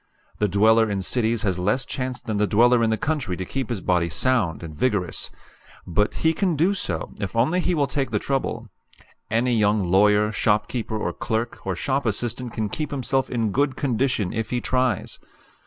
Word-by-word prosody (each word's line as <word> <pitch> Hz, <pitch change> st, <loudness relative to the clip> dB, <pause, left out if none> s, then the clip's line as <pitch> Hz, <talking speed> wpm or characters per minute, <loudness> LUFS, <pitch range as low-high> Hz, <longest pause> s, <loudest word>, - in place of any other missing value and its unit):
The 105 Hz, -, +2 dB
dweller 110 Hz, +3 st, +4 dB
in 100 Hz, -2 st, -2 dB
cities 115 Hz, +1 st, +1 dB
has 95 Hz, -4 st, 0 dB
less 105 Hz, +8 st, 0 dB
chance 130 Hz, -2 st, -3 dB
than 110 Hz, -2 st, -3 dB
the 105 Hz, 0 st, +2 dB
dweller 120 Hz, +3 st, +4 dB
in 115 Hz, -, +2 dB
the 110 Hz, -, +1 dB
country 140 Hz, -, -2 dB
to 95 Hz, -, -4 dB
keep 135 Hz, +5 st, -4 dB
his 115 Hz, -6 st, -3 dB
body 90 Hz, -2 st, +1 dB
sound 110 Hz, -6 st, 0 dB
and 80 Hz, -2 st, -8 dB
vigorous. 100 Hz, -2 st, -1 dB, 0.6 s
But 105 Hz, +5 st, 0 dB
he 160 Hz, -, +5 dB
can 175 Hz, +1 st, 0 dB
do 170 Hz, +7 st, +2 dB
so, 85 Hz, -, -4 dB
if 100 Hz, 0 st, -4 dB
only 135 Hz, +11 st, +2 dB
he 180 Hz, 0 st, +1 dB
will 145 Hz, -3 st, +2 dB
take 135 Hz, 0 st, -2 dB
the -, -, 0 dB
trouble. 125 Hz, -4 st, -2 dB, 0.6 s
Any 120 Hz, +3 st, +1 dB
young 105 Hz, -4 st, +2 dB
lawyer, 105 Hz, +2 st, +4 dB
shopkeeper, 110 Hz, +2 st, 0 dB
or -, -, -2 dB
clerk, 115 Hz, 0 st, -3 dB
or 95 Hz, -, 0 dB
shop 135 Hz, +7 st, -1 dB
assistant 120 Hz, +3 st, -1 dB
can 110 Hz, -1 st, -2 dB
keep 150 Hz, +8 st, -3 dB
himself 135 Hz, -1 st, -1 dB
in 115 Hz, -4 st, -1 dB
good 135 Hz, +3 st, +1 dB
condition 125 Hz, -7 st, 0 dB
if 115 Hz, 0 st, -3 dB
he 125 Hz, -, 0 dB
tries. 130 Hz, -1 st, -1 dB
115 Hz, 190 wpm, -23 LUFS, 105-130 Hz, 0.6 s, he